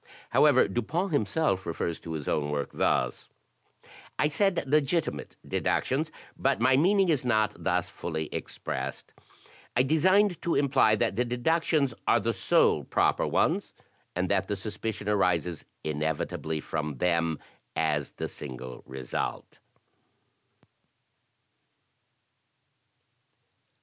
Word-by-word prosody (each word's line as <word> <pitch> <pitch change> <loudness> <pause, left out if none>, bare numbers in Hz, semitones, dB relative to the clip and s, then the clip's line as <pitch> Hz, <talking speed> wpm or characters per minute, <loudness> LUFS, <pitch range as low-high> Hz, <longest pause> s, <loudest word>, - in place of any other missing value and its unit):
However, 145 -4 +5
Dupin 135 - -1
himself 110 - 0
refers 85 0 -2
to 80 - -7
his 75 -3 -5
own 75 -1 0
work 75 -1 -2
thus: - - 0 0.4
" - - -33 0.3
I 150 - +2
said 190 +4 +1
'legitimate 150 +3 0
deductions;' 155 +4 0 0.2
but 135 +1 +1
my 130 +3 +4
meaning 190 +6 +4
is 150 -6 +2
not 110 -4 +2
thus - - +1
fully 80 -2 -4
expressed. 65 +1 -5 0.7
I 125 - +5
designed 185 +6 +3
to 170 - 0
imply 130 -6 +4
that 100 - 0
the 125 - +3
deductions 140 +2 +1
are 120 - +5
the 115 +2 0
sole 95 - +3
proper - - +1
ones, - - 0 0.4
and 90 +1 0
that 95 -1 +1
the 105 - -1
suspicion 105 +1 -4
arises 90 -5 +1 0.2
inevitably 80 +1 -2
from 75 -2 -3
them 85 0 +1 0.4
as 75 -3 0
the - - -4
single 65 -2 -8
result." 65 -2 -5
110 Hz, 115 wpm, -28 LUFS, -, 0.7 s, However